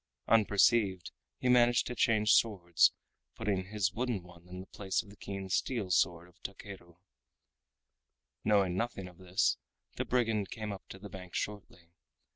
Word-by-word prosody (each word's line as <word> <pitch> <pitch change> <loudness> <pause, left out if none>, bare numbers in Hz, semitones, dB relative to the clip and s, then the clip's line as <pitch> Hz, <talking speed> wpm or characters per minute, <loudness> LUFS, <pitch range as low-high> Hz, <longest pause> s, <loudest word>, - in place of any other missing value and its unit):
Unperceived, 100 -3 +3 0.3
he - - -2
managed 120 -1 +5
to 125 - -4
change 110 -2 +3
swords, 85 -7 +4 0.4
putting 100 -4 -1
his 100 -1 -1
wooden 120 -5 -2
one 90 -1 -16
in 90 +1 -8
place 95 -1 -2
of 100 - -15
the - - -14
keen 100 -1 -6
steel 100 +1 -1
sword 85 0 +2
of 90 - -24
Takeru. 95 -3 -9 1.5
Knowing 100 -4 +3
nothing 100 -2 -3
of 90 0 -15
this, 90 0 +1 0.4
the - - 0
brigand 115 -5 0
came 110 -3 -5
up 100 - -8
to - - -9
the 100 +2 -9
bank 95 -2 -10
shortly. 95 -4 -5
100 Hz, 150 wpm, -32 LUFS, 90-110 Hz, 1.5 s, managed